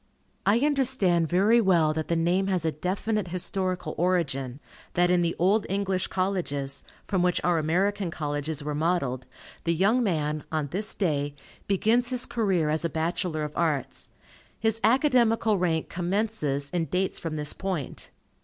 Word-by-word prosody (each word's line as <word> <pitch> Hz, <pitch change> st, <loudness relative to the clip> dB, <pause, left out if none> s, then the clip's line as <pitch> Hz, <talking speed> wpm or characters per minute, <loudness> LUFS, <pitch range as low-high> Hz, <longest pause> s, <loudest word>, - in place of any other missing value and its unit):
I 205 Hz, +3 st, +5 dB
understand 260 Hz, -, +2 dB
very 205 Hz, +8 st, +4 dB
well 170 Hz, -6 st, +3 dB
that 155 Hz, 0 st, -3 dB
the 170 Hz, -, 0 dB
name 175 Hz, +4 st, +1 dB
has 185 Hz, -4 st, 0 dB
a 160 Hz, -, +2 dB
definite 195 Hz, +6 st, -2 dB
historical 185 Hz, -2 st, -2 dB
origin, 140 Hz, -8 st, 0 dB, 0.4 s
that 175 Hz, 0 st, +3 dB
in 180 Hz, -1 st, +3 dB
the 170 Hz, -1 st, 0 dB
old 195 Hz, +5 st, +2 dB
English 195 Hz, -1 st, 0 dB
Colleges, 170 Hz, -8 st, -2 dB, 0.2 s
from 190 Hz, -3 st, 0 dB
which 180 Hz, 0 st, +2 dB
our 175 Hz, -2 st, +2 dB
American 190 Hz, +5 st, 0 dB
Colleges 150 Hz, -1 st, -3 dB
were 150 Hz, 0 st, -3 dB
modelled, 145 Hz, -5 st, -1 dB, 0.4 s
the 170 Hz, 0 st, +1 dB
young 210 Hz, +9 st, +3 dB
man, 155 Hz, -7 st, -1 dB
on 155 Hz, -3 st, -1 dB
this 210 Hz, +4 st, +1 dB
day, 145 Hz, -6 st, -1 dB, 0.3 s
begins 225 Hz, +5 st, +2 dB
his 250 Hz, -1 st, +1 dB
career 195 Hz, -9 st, 0 dB
as 155 Hz, +2 st, 0 dB
a 170 Hz, -, 0 dB
Bachelor 160 Hz, 0 st, -1 dB
of 150 Hz, 0 st, -5 dB
Arts. 155 Hz, -6 st, -1 dB, 0.5 s
His 225 Hz, 0 st, 0 dB
academical 230 Hz, -4 st, +3 dB
rank 165 Hz, -3 st, 0 dB
"commences" 175 Hz, -7 st, -2 dB
and 170 Hz, -2 st, -1 dB
dates 185 Hz, +1 st, 0 dB
from 165 Hz, -2 st, -4 dB
this 150 Hz, -1 st, -2 dB
point. 185 Hz, -8 st, -5 dB
175 Hz, 155 wpm, -26 LUFS, 155-200 Hz, 0.5 s, I